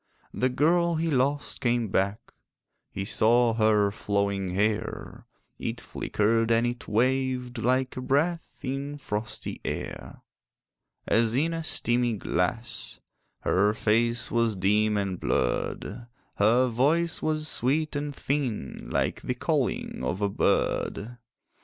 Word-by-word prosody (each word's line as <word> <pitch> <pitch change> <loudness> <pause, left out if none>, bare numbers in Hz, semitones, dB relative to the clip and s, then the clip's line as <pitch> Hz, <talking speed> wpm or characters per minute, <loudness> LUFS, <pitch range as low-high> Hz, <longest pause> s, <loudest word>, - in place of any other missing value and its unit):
The 130 - +1
girl 170 +6 +2
he 160 0 0
lost 140 +2 0
came 120 -4 +1
back: 100 +2 -1 0.6
He 95 - -4
saw 115 +3 +3
her 110 -2 +3
flowing 100 -2 -1
hair; 105 +2 -2 0.3
It - - -3
flickered 115 +2 0
and 115 +1 +3
it 120 0 -4
waved 125 +1 0
Like 130 +2 +1
a 130 - -4
breath 150 +6 0
in 140 +2 -3
frosty 110 -5 -4
air. - - -6 0.8
As 115 0 +2
in 160 +5 +1
a 165 0 -3
steamy 120 -5 0
glass, 110 +4 -2 0.4
Her 105 +3 +2
face 115 +2 +2
was 115 -2 +2
dim 105 +3 +2
and 95 -3 -2
blurred; 105 - -1 0.3
Her 120 +5 +4
voice 150 +8 +2
was 155 0 0
sweet 150 +4 0
and 145 -1 -3
thin, 130 - -3
Like - - -1
the - - -2
calling - - -1
of 90 +11 -2
a 100 - +2
bird. 115 +3 0
120 Hz, 125 wpm, -27 LUFS, 105-135 Hz, 0.8 s, Her